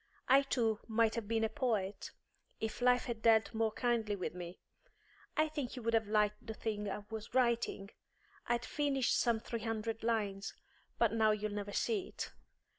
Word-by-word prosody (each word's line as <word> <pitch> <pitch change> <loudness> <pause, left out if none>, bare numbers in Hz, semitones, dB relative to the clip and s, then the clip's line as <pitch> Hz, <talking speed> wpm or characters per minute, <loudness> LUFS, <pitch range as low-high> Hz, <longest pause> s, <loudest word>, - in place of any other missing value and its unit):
I 270 +2 +7
too 230 -6 +1
might 225 0 +3
have 230 -3 -3
been 225 0 +1
a - - +4
poet, 215 -4 -1 0.5
if 220 +2 -3
life 250 0 +4
had 235 -3 -4
dealt 220 -1 +4
more 225 0 +1
kindly 230 -3 0
with 185 - -3
me. 175 0 -7 0.8
I 310 0 +4
think 290 -5 -4
you 250 - -7
would 230 +1 0
have 220 -2 +3
liked 210 0 +1
the 220 - -4
thing 210 -2 -2
I 205 +1 -5
was 220 +2 -6
writing; 235 -5 +1 0.6
I'd 240 0 +1
finished 280 -4 +1
some 235 -2 +2
three 230 +1 -4
hundred 225 0 -2
lines; 205 -4 -1 0.4
but 230 -2 +3
now 220 -1 +4
you'll 215 0 0
never 205 0 -4
see 410 - 0
it. - - -6
225 Hz, 180 wpm, -35 LUFS, 210-240 Hz, 0.8 s, I